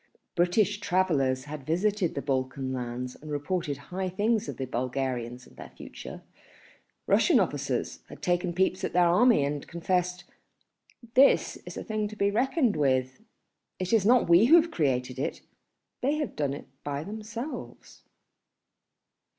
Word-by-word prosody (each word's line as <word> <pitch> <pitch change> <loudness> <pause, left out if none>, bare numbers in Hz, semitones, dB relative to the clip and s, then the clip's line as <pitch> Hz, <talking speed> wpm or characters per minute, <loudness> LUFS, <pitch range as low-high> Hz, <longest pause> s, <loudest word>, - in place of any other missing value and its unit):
British 185 +4 +2
travellers 155 -10 +1
had 150 0 -7
visited 185 +4 0
the 140 - -3
Balkan 130 -1 -2
lands 125 0 -4
and 155 - -10
reported 145 0 -2
high 185 +5 -4
things 215 +4 0
of - - -6
the 135 - -3
Bulgarians 125 -1 -3
and - - -19
their - - -9
future, - - -10 0.8
Russian - - +4
officers - - -2
had - - -11
taken 175 0 +1
peeps 185 0 +1
at - - -2
their 180 0 +5
army 180 - +4
and 145 0 -4
confessed 180 +1 -1 0.9
"this 270 +3 +4
is - - -7
a - - -4
thing 215 -2 -2
to 215 - -9
be 200 -1 +1
reckoned 255 +2 +1
with, 130 -3 +1
and - - -26 0.5
it 185 +3 -3
is 220 -4 +4
not 240 +4 +4
we 170 +5 +6
who 305 +7 +7
have 330 +1 -1
created 130 -4 -1
it, 140 - -3 0.6
they 280 +4 +1
have 300 -2 -3
done 140 -2 -1
it - - -9 0.2
by 145 0 -3
themselves." 220 - -7
175 Hz, 155 wpm, -28 LUFS, 135-210 Hz, 0.9 s, who